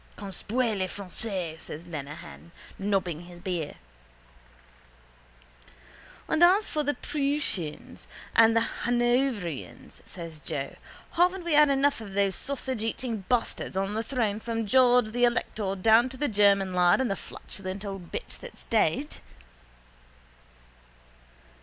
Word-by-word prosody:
—Conspuez 215 Hz, +4 st, -1 dB
les 185 Hz, -, 0 dB
Français, 185 Hz, -4 st, -3 dB
says 160 Hz, +1 st, -8 dB
Lenehan, 140 Hz, -, -8 dB, 0.3 s
nobbling 190 Hz, -4 st, -1 dB
his 175 Hz, 0 st, -12 dB
beer. 175 Hz, -4 st, -3 dB, 2.5 s
—And 315 Hz, +2 st, +3 dB
as 385 Hz, +5 st, +6 dB
for 305 Hz, -, -1 dB
the 290 Hz, 0 st, 0 dB
Prooshians 275 Hz, -, -2 dB, 0.3 s
and 225 Hz, 0 st, +6 dB
the 230 Hz, -, +3 dB, 0.2 s
Hanoverians, 240 Hz, -, -1 dB
says 165 Hz, -3 st, -9 dB
Joe, 145 Hz, -3 st, -4 dB, 0.4 s
haven't 360 Hz, +2 st, +2 dB
we 340 Hz, -, 0 dB
had 300 Hz, 0 st, +7 dB
enough 275 Hz, -2 st, +2 dB
of 200 Hz, -3 st, -8 dB
those 200 Hz, -1 st, +2 dB
sausageeating 245 Hz, -5 st, -3 dB
bastards 240 Hz, -5 st, -1 dB
on 195 Hz, +1 st, 0 dB
the 220 Hz, -, 0 dB
throne 225 Hz, -3 st, -1 dB
from 225 Hz, 0 st, -2 dB
George 245 Hz, 0 st, +4 dB
the 245 Hz, +2 st, +3 dB
elector 215 Hz, -4 st, -1 dB
down 225 Hz, +5 st, +5 dB
to 260 Hz, -, -10 dB
the 290 Hz, -, 0 dB
German 200 Hz, -4 st, +3 dB
lad 180 Hz, +2 st, +4 dB
and 255 Hz, -5 st, +1 dB
the -, -, 0 dB
flatulent 195 Hz, +1 st, -7 dB
old 195 Hz, -3 st, -7 dB
bitch 485 Hz, -, -6 dB
that's -, -, -8 dB
dead? 230 Hz, -, +1 dB
215 Hz, 125 wpm, -28 LUFS, 185-255 Hz, 2.5 s, had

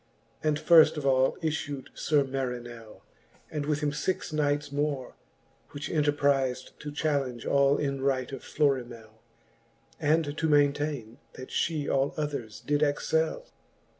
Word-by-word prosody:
And 155 Hz, -1 st, +2 dB
firft 160 Hz, 0 st, +6 dB
of 145 Hz, -, -4 dB
all 130 Hz, -1 st, +3 dB
iffu'd 145 Hz, -4 st, -3 dB
Sir 145 Hz, -2 st, +2 dB
Marinell, 120 Hz, -4 st, -5 dB, 0.5 s
And 150 Hz, -2 st, -3 dB
with 150 Hz, -1 st, 0 dB
him 150 Hz, -1 st, +1 dB
fixe 155 Hz, +2 st, -2 dB
knights 145 Hz, -1 st, 0 dB
more, 145 Hz, -2 st, -2 dB, 0.6 s
which 145 Hz, 0 st, -5 dB
enterpriz'd 140 Hz, -4 st, +1 dB
To 150 Hz, -, -6 dB
challenge 140 Hz, -5 st, -1 dB
all 140 Hz, 0 st, +3 dB
in 140 Hz, -2 st, -2 dB
right 130 Hz, -2 st, 0 dB
of 135 Hz, -, -6 dB
Florimell, 120 Hz, -6 st, -2 dB, 0.8 s
And 155 Hz, -1 st, +1 dB
to 160 Hz, 0 st, 0 dB
maintaine, 145 Hz, -5 st, +1 dB
that 130 Hz, -, -9 dB
fhe 155 Hz, -3 st, -1 dB
all 135 Hz, +1 st, +1 dB
others 140 Hz, -8 st, -4 dB
did 145 Hz, 0 st, 0 dB
excell. 155 Hz, +2 st, 0 dB
145 Hz, 135 wpm, -28 LUFS, 130-150 Hz, 0.8 s, firft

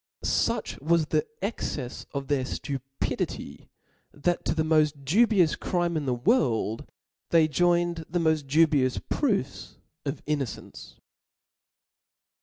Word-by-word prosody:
Such -, -, 0 dB
wa^ 165 Hz, +4 st, +3 dB
the 155 Hz, -, +1 dB
the 150 Hz, -, 0 dB, 0.2 s
excefs 135 Hz, -, -5 dB
of 140 Hz, -1 st, -4 dB
their 140 Hz, -2 st, +1 dB
(lupidity, 135 Hz, 0 st, -4 dB, 0.4 s
that 175 Hz, +4 st, -1 dB
to -, -, 0 dB
the 160 Hz, -, +1 dB
mod 155 Hz, -3 st, +2 dB
dubious 195 Hz, -, +4 dB
crime 175 Hz, -2 st, -1 dB
in 150 Hz, -3 st, -2 dB
the 125 Hz, -, +1 dB
world, 120 Hz, -, +1 dB, 0.4 s
they 165 Hz, -2 st, +5 dB
joined 175 Hz, +1 st, +1 dB
the 175 Hz, -, -1 dB
moil 160 Hz, -1 st, +3 dB
dubious 145 Hz, -2 st, +2 dB
proofs 200 Hz, -, -1 dB, 0.3 s
of 140 Hz, -1 st, -4 dB
innocence. 140 Hz, -7 st, -5 dB
155 Hz, 120 wpm, -27 LUFS, 135-170 Hz, 0.4 s, they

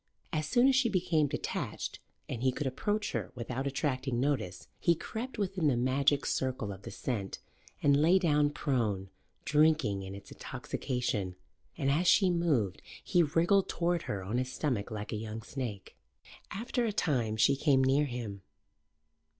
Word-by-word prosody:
As 155 Hz, -1 st, 0 dB
soon 250 Hz, +1 st, +5 dB
as 270 Hz, -, +4 dB
she 260 Hz, -3 st, +3 dB
became 170 Hz, -6 st, +2 dB
detached -, -, -4 dB, 0.3 s
and 115 Hz, -, -4 dB
he 130 Hz, 0 st, +3 dB
could 145 Hz, +3 st, -4 dB
approach 205 Hz, +11 st, -1 dB
her -, -, -3 dB
without 125 Hz, +3 st, -3 dB
attracting 135 Hz, -3 st, -1 dB
notice, 125 Hz, -10 st, -1 dB
he 170 Hz, -, +3 dB
crept 235 Hz, +10 st, -6 dB
within 190 Hz, -5 st, 0 dB
the 130 Hz, -4 st, +3 dB
magic 135 Hz, +3 st, +2 dB
circle 130 Hz, -6 st, -1 dB
of 95 Hz, -, -11 dB
the -, -, -8 dB
scent 105 Hz, -7 st, -3 dB, 0.5 s
and 140 Hz, -1 st, +5 dB
lay 170 Hz, +5 st, +6 dB
down 150 Hz, -5 st, +3 dB
prone, 110 Hz, -10 st, -1 dB, 0.3 s
drinking 150 Hz, -10 st, +3 dB
in 95 Hz, 0 st, -7 dB
its 100 Hz, 0 st, -12 dB
intoxication, 105 Hz, -7 st, -3 dB, 0.4 s
and, 135 Hz, -, +1 dB
as 170 Hz, +5 st, +2 dB
she 190 Hz, +1 st, +5 dB
moved, 145 Hz, -, +1 dB, 0.2 s
he 175 Hz, -, +3 dB
wriggled 170 Hz, +5 st, +3 dB
toward 175 Hz, 0 st, 0 dB
her 100 Hz, -2 st, -2 dB
on 110 Hz, +6 st, -1 dB
his 130 Hz, 0 st, -2 dB
stomach 125 Hz, -8 st, -1 dB
like 105 Hz, -2 st, -5 dB
a -, -, -2 dB
young 110 Hz, +1 st, -6 dB
snake. 120 Hz, -7 st, -6 dB, 0.5 s
After 240 Hz, +4 st, -2 dB
a 225 Hz, -, +1 dB
time 125 Hz, -, 0 dB
she 135 Hz, +5 st, +5 dB
came 135 Hz, -1 st, +3 dB
near 135 Hz, +3 st, +3 dB
him. 115 Hz, -7 st, -5 dB
135 Hz, 165 wpm, -31 LUFS, 115-165 Hz, 0.5 s, lay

